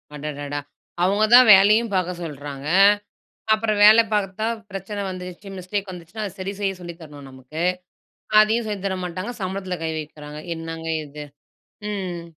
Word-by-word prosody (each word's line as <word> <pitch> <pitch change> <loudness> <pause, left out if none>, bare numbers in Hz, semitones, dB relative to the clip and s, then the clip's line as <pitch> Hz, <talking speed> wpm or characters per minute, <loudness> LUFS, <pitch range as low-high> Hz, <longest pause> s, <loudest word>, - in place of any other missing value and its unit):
அடடடா! 145 -1 -5 0.4
அவங்க 200 +4 +2
தான் 250 0 +9
வேலையும் 210 +4 +5
பாக்க 180 -1 0
சொல்றாங்க, 145 -3 -7 0.9
அப்புறம் 215 -1 0
வேல 215 +2 +9
பாத்தா 205 +1 -1 0.3
பிரச்சனை 195 +1 -5
வந்துருச்சு, 180 +1 -8
மிஸ்டேக் 190 +2 -4
வந்துச்சுனா 180 +5 -8
அத 200 - -5
சரி 190 +1 -4
செய்ய 195 -1 -1
சொல்லி 175 -1 -8
தரணும் 145 -3 -11
நமக்கு. 130 +4 -8 0.8
அதையும் 220 +2 +2
சொல்லித் 200 -2 -4
தர 190 -1 -1
மாட்டாங்க. 185 +6 -5
சம்பளத்தில 185 -1 -3
கை 160 - -1
வைக்கிறாங்க 150 0 -9 0.2
என்னங்க 165 0 -6 0.2
இது, 150 +1 -9 0.7
ம். 185 -4 -4
185 Hz, 140 wpm, -22 LUFS, 155-205 Hz, 0.9 s, தான்